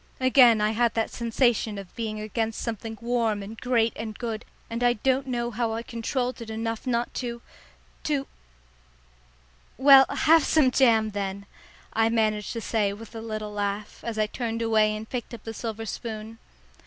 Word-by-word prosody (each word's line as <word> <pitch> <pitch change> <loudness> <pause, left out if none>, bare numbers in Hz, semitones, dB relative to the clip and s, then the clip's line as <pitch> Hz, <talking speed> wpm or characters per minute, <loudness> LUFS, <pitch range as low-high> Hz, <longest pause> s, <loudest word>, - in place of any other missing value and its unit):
Again 250 -4 +6
I 210 0 +2
had 235 +1 +1
that 225 -1 0
sensation 235 -2 +1
of 195 -2 -9
being 220 -2 -3
against 220 +1 -2
something 225 -1 -4
warm 230 -4 0
and 210 +3 -8
great 235 -3 +2
and 220 -1 -6
good, 225 -2 -4 0.2
and 230 +1 -4
I 245 0 +4
don't 260 +4 0
know 240 -1 -2
how 225 0 -1
I 230 - -4
controlled 245 +2 -3
it 230 - -7
enough 225 +2 -4
not 235 -1 0
to 235 -1 -4 0.7
to 285 -3 0 1.5
"Well, 270 +1 +8
have 325 0 +4
some 295 -5 +4
jam 225 -5 +4
then," 200 -1 -4 0.5
I 225 0 +3
managed 215 -2 0
to 230 - -4
say 210 -3 0
with 225 +2 -11
a 225 - -6
little 215 -2 -5
laugh, 205 0 -3
as 230 -2 -4
I 215 - +3
turned 230 +1 -3
away 215 -1 +3
and 215 +1 -7
picked 240 -1 -5
up 225 - -14
the 225 - -6
silver 225 0 -5
spoon. 220 0 -6
225 Hz, 175 wpm, -26 LUFS, 215-240 Hz, 1.5 s, Well